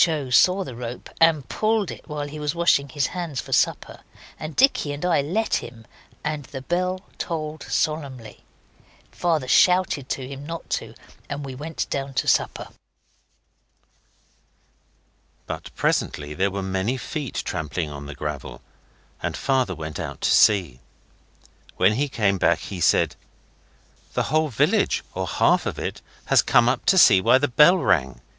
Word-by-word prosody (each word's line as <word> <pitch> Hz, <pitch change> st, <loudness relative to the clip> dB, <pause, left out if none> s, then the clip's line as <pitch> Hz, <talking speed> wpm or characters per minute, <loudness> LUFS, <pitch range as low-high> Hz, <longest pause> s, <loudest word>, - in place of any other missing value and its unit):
O. 150 Hz, -6 st, -3 dB
saw 185 Hz, +9 st, +4 dB
the 135 Hz, -, -8 dB
rope 120 Hz, 0 st, -7 dB
and 160 Hz, -4 st, +4 dB
pulled 215 Hz, -4 st, 0 dB
it -, -, -11 dB
while 150 Hz, -1 st, -4 dB
he 150 Hz, +1 st, -8 dB
was 150 Hz, +1 st, -2 dB
washing 155 Hz, -5 st, +2 dB
his 140 Hz, +1 st, -1 dB
hands 170 Hz, -7 st, -4 dB
for -, -, -5 dB
supper, -, -, 0 dB, 0.4 s
and 155 Hz, 0 st, -6 dB
Dicky 250 Hz, -, +3 dB
and 145 Hz, +4 st, -5 dB
I 170 Hz, -5 st, +3 dB
let 190 Hz, +11 st, 0 dB
him, 115 Hz, -2 st, -9 dB, 0.4 s
and 150 Hz, -2 st, -3 dB
the 135 Hz, -2 st, -8 dB
bell 180 Hz, +4 st, -1 dB, 0.2 s
tolled 155 Hz, -2 st, -4 dB
solemnly. 140 Hz, -7 st, -2 dB, 0.7 s
Father 160 Hz, -7 st, 0 dB
shouted 180 Hz, -3 st, +3 dB
to 130 Hz, -2 st, -3 dB
him 140 Hz, +1 st, -8 dB
not 165 Hz, +2 st, -7 dB
to, -, -, -3 dB, 0.3 s
and 145 Hz, 0 st, -4 dB
we 135 Hz, -, -6 dB
went 155 Hz, +5 st, -4 dB
down 135 Hz, -1 st, -3 dB
to -, -, 0 dB
supper. -, -, +1 dB, 2.8 s
But -, -, -6 dB
presently 75 Hz, 0 st, -1 dB
there 95 Hz, +5 st, +1 dB
were 100 Hz, 0 st, -4 dB
many 95 Hz, +6 st, -1 dB
feet 140 Hz, +1 st, -5 dB
trampling 75 Hz, +1 st, -3 dB
on 70 Hz, 0 st, -8 dB
the 75 Hz, -, -8 dB
gravel, 75 Hz, -1 st, -6 dB, 0.6 s
and -, -, -3 dB
Father 130 Hz, -8 st, 0 dB
went 80 Hz, -1 st, -6 dB
out -, -, -6 dB
to -, -, +2 dB
see. 90 Hz, -, +4 dB, 1.0 s
When 95 Hz, +3 st, +4 dB
he 140 Hz, +5 st, -1 dB
came 100 Hz, -6 st, +1 dB
back 85 Hz, -, +3 dB
he 95 Hz, +1 st, -7 dB
said -, -, +3 dB, 1.0 s
'The -, -, +1 dB
whole 155 Hz, 0 st, +3 dB
village, 120 Hz, -, +1 dB
or -, -, -3 dB
half -, -, +2 dB
of -, -, -4 dB
it, -, -, -5 dB, 0.2 s
has -, -, +5 dB
come 120 Hz, 0 st, +4 dB
up 125 Hz, -, 0 dB
to 190 Hz, -, +5 dB
see 100 Hz, -, +7 dB
why 130 Hz, -, +5 dB
the 145 Hz, +2 st, +1 dB
bell 150 Hz, +8 st, +6 dB
rang. 65 Hz, -, +1 dB
140 Hz, 160 wpm, -23 LUFS, 105-155 Hz, 2.8 s, see